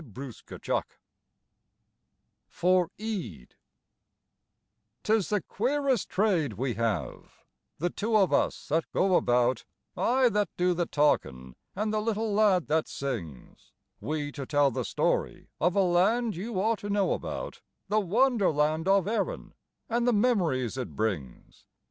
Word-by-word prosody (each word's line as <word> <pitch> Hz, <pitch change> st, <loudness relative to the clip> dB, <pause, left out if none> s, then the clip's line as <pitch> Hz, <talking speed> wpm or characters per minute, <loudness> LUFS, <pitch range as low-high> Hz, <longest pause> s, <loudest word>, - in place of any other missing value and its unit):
TWO 135 Hz, -1 st, -6 dB
SEANICHIES -, -, -3 dB, 1.7 s
(For 180 Hz, -1 st, +2 dB
Aedh) 210 Hz, -, -5 dB, 1.5 s
'Tis 215 Hz, -3 st, +1 dB
the 210 Hz, -2 st, +1 dB
queerest 265 Hz, +1 st, 0 dB
trade 185 Hz, -, +1 dB
we 125 Hz, +4 st, -2 dB
have, 110 Hz, -5 st, -4 dB, 0.3 s
the 175 Hz, +3 st, -1 dB
two 220 Hz, +1 st, +1 dB
of 195 Hz, -4 st, +3 dB
us -, -, 0 dB
that 160 Hz, +2 st, 0 dB
go 190 Hz, -1 st, +3 dB
about, 120 Hz, -2 st, +2 dB, 0.3 s
I 255 Hz, +1 st, +3 dB
that 205 Hz, -4 st, 0 dB
do 180 Hz, 0 st, +2 dB
the 175 Hz, -1 st, -1 dB
talkin', 65 Hz, -, 0 dB, 0.2 s
and 215 Hz, +2 st, -1 dB
the 215 Hz, -, +1 dB
little 220 Hz, -1 st, -1 dB
lad 200 Hz, -5 st, +3 dB
that 160 Hz, +1 st, 0 dB
sings, 95 Hz, -, -6 dB, 0.3 s
We 150 Hz, -1 st, -3 dB
to 140 Hz, -2 st, -7 dB
tell 145 Hz, -2 st, +3 dB
the 130 Hz, -2 st, -3 dB
story -, -, -1 dB
of 175 Hz, +4 st, +1 dB
a 200 Hz, -, +4 dB
Land 200 Hz, +6 st, +2 dB
you 195 Hz, +3 st, -4 dB
ought 220 Hz, +2 st, +1 dB
to 205 Hz, -, -6 dB
know 200 Hz, -1 st, +2 dB
about, -, -, -5 dB, 0.3 s
The 215 Hz, -, +2 dB
wonder 220 Hz, +2 st, +2 dB
land 155 Hz, +3 st, 0 dB
of 195 Hz, -1 st, +3 dB
Erin 230 Hz, -, -2 dB, 0.3 s
and 235 Hz, +1 st, 0 dB
the 245 Hz, -, +4 dB
memories 175 Hz, -, +1 dB
it 125 Hz, -, -6 dB
brings. 95 Hz, -, -4 dB
180 Hz, 140 wpm, -28 LUFS, 140-215 Hz, 1.7 s, a